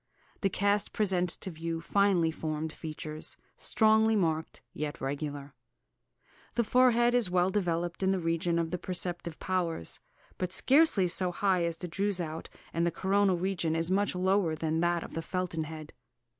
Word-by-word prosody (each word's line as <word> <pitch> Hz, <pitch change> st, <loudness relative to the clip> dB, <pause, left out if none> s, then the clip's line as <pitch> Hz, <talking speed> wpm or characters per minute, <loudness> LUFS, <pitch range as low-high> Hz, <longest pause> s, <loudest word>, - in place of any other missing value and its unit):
The 195 Hz, -, +1 dB
cast 200 Hz, +2 st, +1 dB
presents 185 Hz, -4 st, +1 dB
to 190 Hz, -, -7 dB
view 165 Hz, 0 st, -4 dB
finely 180 Hz, -1 st, +2 dB
formed 155 Hz, 0 st, -4 dB
features, 155 Hz, -1 st, -5 dB, 0.2 s
strongly 220 Hz, 0 st, +3 dB
marked, 160 Hz, -5 st, -1 dB
yet 150 Hz, 0 st, -4 dB
regular. 145 Hz, +1 st, -4 dB, 1.0 s
The 235 Hz, -, +2 dB
forehead 240 Hz, 0 st, +4 dB
is 245 Hz, -6 st, +2 dB
well 180 Hz, +1 st, +2 dB
developed 175 Hz, -3 st, -1 dB
in 190 Hz, -, +2 dB
the 195 Hz, -, +2 dB
region 165 Hz, 0 st, 0 dB
of 165 Hz, -1 st, -1 dB
the 180 Hz, -, -2 dB
perceptive 175 Hz, -2 st, -3 dB
powers; 170 Hz, -, -2 dB, 0.4 s
but 185 Hz, -1 st, -2 dB
scarcely 260 Hz, -, +5 dB
so 180 Hz, +1 st, 0 dB
high 185 Hz, -1 st, +1 dB
as 165 Hz, -1 st, -2 dB
the 180 Hz, -, -5 dB
Droeshout, 175 Hz, -3 st, -2 dB, 0.2 s
and 165 Hz, -, 0 dB
the 170 Hz, -, +3 dB
coronal 190 Hz, +2 st, +2 dB
region 175 Hz, -3 st, -1 dB
is 165 Hz, +2 st, 0 dB
much 200 Hz, 0 st, +1 dB
lower 185 Hz, -2 st, +2 dB
than 155 Hz, 0 st, -2 dB
in 160 Hz, -, +1 dB
that 175 Hz, 0 st, +1 dB
of -, -, -10 dB
the 165 Hz, -, -3 dB
Felton 175 Hz, -2 st, -3 dB
head. 155 Hz, -1 st, -9 dB
175 Hz, 165 wpm, -30 LUFS, 165-195 Hz, 1.0 s, scarcely